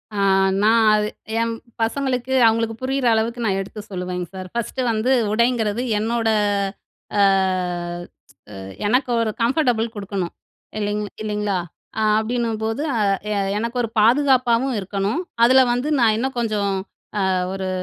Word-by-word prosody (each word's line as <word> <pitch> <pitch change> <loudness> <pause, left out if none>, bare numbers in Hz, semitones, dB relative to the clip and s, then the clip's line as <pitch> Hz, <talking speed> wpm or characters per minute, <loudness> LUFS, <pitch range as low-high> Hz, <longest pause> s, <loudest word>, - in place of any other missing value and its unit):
ஆ. - - -4 0.5
நான் 225 +1 +5
அது 210 0 +1 0.3
என் 230 0 0 0.3
பசங்களுக்கு 255 +1 -1
அவங்களுக்கு 225 0 +1
புரியிற 265 0 -1
அளவுக்கு 230 +2 -1
நான் 195 -2 +1
எடுத்து 200 +2 -8
சொல்லுவேங்க 180 -1 -4
சார். 185 -1 -6
1ஸ்ட் 235 +2 -2
வந்து 225 +3 0 0.2
உடைங்கிறது 235 -1 +1 0.2
என்னோட 225 +1 0 0.9
அ - - +4 1.7
எனக்கு 250 +4 +1
ஒரு 220 - 0
கம்ஃபர்டபுள் 245 -3 +2
குடுக்கணும். 195 -4 -4 0.5
இல்லைங் 210 0 -1 0.2
இல்லைங்களா? 210 -2 -1 0.4
ஆ - - +1 0.2
அப்படின்னும்போது, 225 +1 -2
"ஆ - - +1 0.3
'எ - - 0 0.2
எனக்கு 230 +3 -3
ஒரு 230 - -2
பாதுகாப்பாவும் 255 +1 +3
இருக்கணும். 200 - -2 0.2
அதில 260 +2 +6
வந்து 245 +4 -1
நான் 225 -2 +4
இன்னும் 260 +3 -2
கொஞ்சம் 210 -4 0 0.6
ஆ - - +2 0.2
ஒரு 190 -1 -3
225 Hz, 130 wpm, -21 LUFS, 210-245 Hz, 1.7 s, அதில